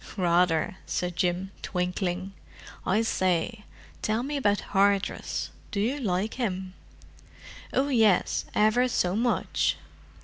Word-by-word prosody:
"Rather!" 175 -1 +2
said 180 -1 -2
Jim, 180 +1 0
twinkling. 180 +1 -2 0.5
"I 210 +5 +3
say, 190 +1 0 0.4
tell 220 +2 0
me 290 +2 -3
about 205 -7 +2
Hardress. 200 0 +1 0.2
Do 200 - -3
you 250 +8 0
like 200 -2 -1
him?" 190 -4 -2 1.0
"Oh, 275 +2 +1
yes, 220 -8 +3
ever 215 +4 +4
so 185 -6 +1
much." 240 +2 +1
195 Hz, 110 wpm, -27 LUFS, 180-225 Hz, 1.0 s, ever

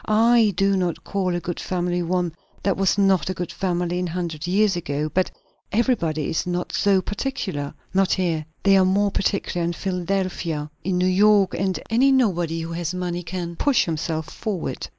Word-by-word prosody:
I 225 0 +4
do 195 +1 +3
not 180 -3 -1
call 185 -3 -1
a - - 0
good 175 0 -5
family 175 -1 -1
one 175 -1 -1 0.3
that 195 - +2
was 195 0 +2
not 195 -3 +3
a 185 - -2
good 175 0 -4
family 175 0 -1
a 180 - -1
hundred 170 -2 -4
years 200 +1 +3
ago; 150 -2 -2
but 185 0 +2 0.4
everybody 170 - +1
is 160 - -1
not 180 0 -2
so 195 -2 +3
particular. 195 - -3 0.2
Not 190 0 +3
here. 170 -4 0 0.2
They 195 -1 +6
are 190 - +5
more 200 +2 +2
particular 195 -3 -1
in 170 +1 0
Philadelphia. 180 -5 -2
In 185 -1 0
New 180 - +2
York, 200 +1 +4 0.4
any 260 +4 +4
nobody 175 -10 +1
who 165 +1 -5
has 170 +1 -3
money 175 -1 -2
can 175 -1 -5
push 285 -4 +3
himself 160 -1 -2
forward." 200 -6 -4
180 Hz, 175 wpm, -23 LUFS, 170-195 Hz, 0.4 s, They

